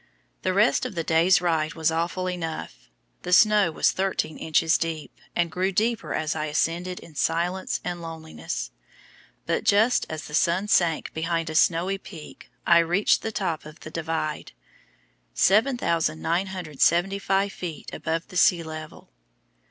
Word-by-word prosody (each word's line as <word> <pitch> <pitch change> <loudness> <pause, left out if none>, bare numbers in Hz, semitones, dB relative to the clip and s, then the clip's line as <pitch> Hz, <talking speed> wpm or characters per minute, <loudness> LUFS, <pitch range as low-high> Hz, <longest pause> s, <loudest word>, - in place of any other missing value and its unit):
The 185 - 0
rest 205 +5 +3
of 250 -6 -4
the 165 - -1
day's 170 +3 +4
ride 160 -3 0
was 160 -1 +1
awful 170 +3 -1
enough. 160 - -5 0.3
The 180 - -5
snow 210 -2 +5
was - - +2
thirteen 190 -4 -2
inches 160 0 +2
deep, 160 -2 -4 0.2
and 170 -1 +1
grew 185 +3 0
deeper 220 +3 0
as 155 +1 -1
I 155 -1 -2
ascended 170 +4 -1
in 160 - -14
silence 170 +5 -1
and 175 -1 -4
loneliness, 160 - -6 0.7
but - - -1
just 220 +5 +3
as 155 -1 -5
the 150 - -11
sun 170 +6 +2
sank 170 -5 +2
behind 165 0 -2
a - - -6
snowy 180 +4 +2
peak 165 -6 -12 0.2
I 170 -1 +6
reached 175 +5 +2
the 225 - -3
top 185 -7 -2
of 155 +1 -13
the 155 - -9
Divide, 160 -2 -3 0.8
7,975 190 - +1
feet 170 -4 -7
above 165 +1 -3
the 180 - -6
sea 170 -1 +4
level. 155 - -9
170 Hz, 145 wpm, -25 LUFS, 160-185 Hz, 0.8 s, I